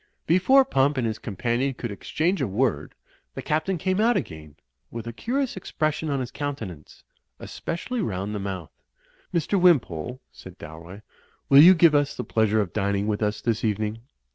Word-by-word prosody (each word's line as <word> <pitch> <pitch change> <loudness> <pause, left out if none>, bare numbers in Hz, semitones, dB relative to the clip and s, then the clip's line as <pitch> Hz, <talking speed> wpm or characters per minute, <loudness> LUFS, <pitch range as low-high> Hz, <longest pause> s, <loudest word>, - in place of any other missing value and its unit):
Before 225 - +5
Pump 140 - +1
and 125 - 0
his 110 -1 -3
companion 120 +6 -2
could 120 -2 -5
exchange 170 - -1
a - - 0
word, 105 - -1 0.4
the - - -5
Captain 155 +5 -1
came 185 +4 0
out 235 +2 +3
again, 75 -3 -7 0.3
with 115 -1 -7
a 115 - -6
curious 255 - -2
expression 155 -4 -2
on 140 -1 0
his 125 -1 -4
countenance, 110 - -7 0.3
especially 230 +8 -5
rotind 100 - -3
the 105 - -3
mouth. 95 -4 -5 0.6
"Mr. 175 +3 0
Wimpole," 125 - +2
said 95 0 -13
Dalroy, 85 +6 -11 0.5
"will 140 +1 +9
you 180 +4 +9
give 165 -2 +5
us 145 -1 +1
the - - -4
pleasure 110 -1 +1
of 95 -4 -4
dining 100 -1 0
with 105 0 -2
us 105 0 -1
this 115 -1 -1
evening? 110 0 -1
120 Hz, 170 wpm, -25 LUFS, 100-160 Hz, 0.6 s, will